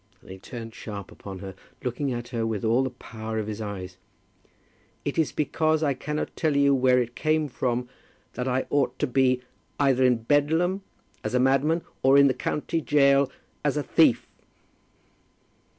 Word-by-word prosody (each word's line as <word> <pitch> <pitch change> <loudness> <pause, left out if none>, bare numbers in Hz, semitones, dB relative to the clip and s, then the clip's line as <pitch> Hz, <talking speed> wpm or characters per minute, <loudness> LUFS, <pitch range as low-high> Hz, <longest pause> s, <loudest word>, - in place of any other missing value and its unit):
and - - -13
he 95 - -9
turned 115 +1 -8
sharp 100 -5 -8
upon 95 -1 -9
her, 95 0 -8 0.3
looking 130 +3 -2
at 120 0 -4
her 115 -2 -2
with 110 -2 -2
all 115 +3 +3
the 130 - -1
power 110 -3 -7
of 110 - -1
his 110 0 -5
eyes. 95 -3 -6 1.1
"It - - -1
is 160 - +2
because 155 +1 +1
I 145 -2 +2
cannot 150 +4 -4
tell 155 -3 0
you 140 0 +5
where 130 -1 +4
it 120 -1 -2
came 155 -1 +1
from 125 -2 -2 0.5
that 125 +1 -3
I 130 0 0
ought 145 -2 +1
to - - +1
be, 130 -1 +2 0.4
either 135 -2 +3
in 125 -3 +3
Bedlam, 160 - +2 0.4
as - - -2
a - - +4
madman, 135 +6 +2 0.2
or 135 +1 +5
in 140 - +7
the 135 - +4
county 160 +4 -2
gaol 140 -2 +4 0.3
as - - +1
a - - 0
thief." - - +3
130 Hz, 175 wpm, -26 LUFS, 115-145 Hz, 1.1 s, in